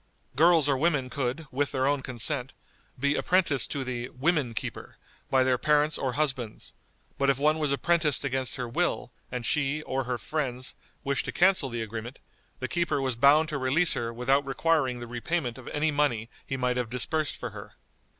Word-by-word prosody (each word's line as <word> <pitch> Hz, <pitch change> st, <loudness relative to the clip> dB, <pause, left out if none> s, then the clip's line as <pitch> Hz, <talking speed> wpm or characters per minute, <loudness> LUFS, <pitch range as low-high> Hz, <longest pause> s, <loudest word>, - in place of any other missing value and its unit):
Girls 165 Hz, 0 st, +5 dB
or 140 Hz, -, +3 dB
women 135 Hz, -3 st, +1 dB
could, 135 Hz, +4 st, -2 dB
with 140 Hz, +2 st, 0 dB
their 130 Hz, -1 st, +1 dB
own 140 Hz, 0 st, +2 dB
consent, 130 Hz, +1 st, -2 dB, 0.4 s
be 140 Hz, +2 st, +2 dB
apprenticed 175 Hz, -5 st, +1 dB
to 140 Hz, -2 st, -2 dB
the 125 Hz, -1 st, -4 dB
"women 140 Hz, -4 st, 0 dB
keeper" -, -, -5 dB, 0.3 s
by 130 Hz, -1 st, +4 dB
their 130 Hz, -1 st, +2 dB
parents 150 Hz, 0 st, +3 dB
or 130 Hz, -2 st, -2 dB
husbands; 135 Hz, -6 st, -2 dB, 0.5 s
but 140 Hz, 0 st, +3 dB
if 135 Hz, -, +3 dB
one 155 Hz, +3 st, +2 dB
was 150 Hz, -2 st, 0 dB
apprenticed 150 Hz, +1 st, +1 dB
against 130 Hz, -1 st, -2 dB
her 125 Hz, -2 st, -3 dB
will, 115 Hz, -, -1 dB, 0.2 s
and 125 Hz, -2 st, -4 dB
she, 150 Hz, +2 st, 0 dB
or 130 Hz, -2 st, -2 dB
her 125 Hz, 0 st, -1 dB
friends, 130 Hz, 0 st, -3 dB, 0.3 s
wished 140 Hz, -1 st, 0 dB
to -, -, -3 dB
cancel 185 Hz, -6 st, +3 dB
the 120 Hz, -2 st, -3 dB
agreement, 115 Hz, +3 st, -6 dB, 0.4 s
the 130 Hz, -, -2 dB
keeper 170 Hz, -3 st, 0 dB
was 130 Hz, -3 st, 0 dB
bound 145 Hz, +6 st, +5 dB
to 150 Hz, -3 st, -2 dB
release 145 Hz, +7 st, +3 dB
her 115 Hz, 0 st, -2 dB
without 130 Hz, +4 st, +2 dB
requiring 135 Hz, -1 st, +1 dB
the 120 Hz, -, -6 dB
repayment 120 Hz, +1 st, -2 dB
of 125 Hz, -, -12 dB
any 155 Hz, +1 st, 0 dB
money 120 Hz, -6 st, 0 dB, 0.2 s
he 135 Hz, -, -2 dB
might 125 Hz, -1 st, 0 dB
have 125 Hz, -3 st, -1 dB
disbursed 150 Hz, +5 st, 0 dB
for -, -, -5 dB
her. -, -, -10 dB
135 Hz, 190 wpm, -28 LUFS, 125-150 Hz, 0.5 s, Girls